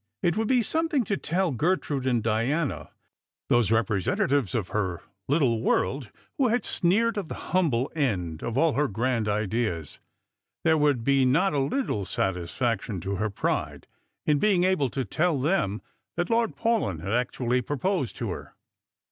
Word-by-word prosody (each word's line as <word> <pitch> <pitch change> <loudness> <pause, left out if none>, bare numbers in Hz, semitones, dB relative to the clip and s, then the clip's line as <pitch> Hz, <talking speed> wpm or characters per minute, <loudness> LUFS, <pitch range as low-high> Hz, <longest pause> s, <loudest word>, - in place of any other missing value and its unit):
It 175 -1 +2
would 220 0 0
be 250 -1 +3
something 320 +1 0
to 200 -1 -1
tell 180 0 0
Gertrude 145 -1 0
and 120 -4 +1
Diana— 125 +8 0 0.6
those 120 -5 +3
representatives 110 +3 +1
of 105 -6 -1
her 95 -5 -2 0.2
little 130 -6 +2
world, 130 +1 0 0.3
who 265 - +4
had 240 +2 0
sneered 210 +5 +1
at 190 - -5
the - - -4
humble 150 -8 0
end 90 - -1
of 120 +1 -3
all 160 +1 +3
her 150 +1 +1
grand 115 0 -1
ideas: 105 -6 -2 0.6
there 160 -1 +4
would 145 -6 +2
be 140 +1 +3
not 155 +9 +3
a 145 - +1
little 135 - -1
satisfaction 95 +4 -2
to 100 +2 -3
her 110 +2 0
pride 100 - -2 0.4
in 150 -2 +3
being 195 -2 +3
able 185 -8 +2
to 130 +2 -3
tell 155 - +1
them 130 - 0 0.3
that 175 - -1
Lord 230 -1 +1
Paulyn 220 - 0
had 100 +3 -2
actually 125 0 0
proposed 145 +2 -1
to - - -3
her. - - -8
135 Hz, 160 wpm, -26 LUFS, 110-175 Hz, 0.6 s, who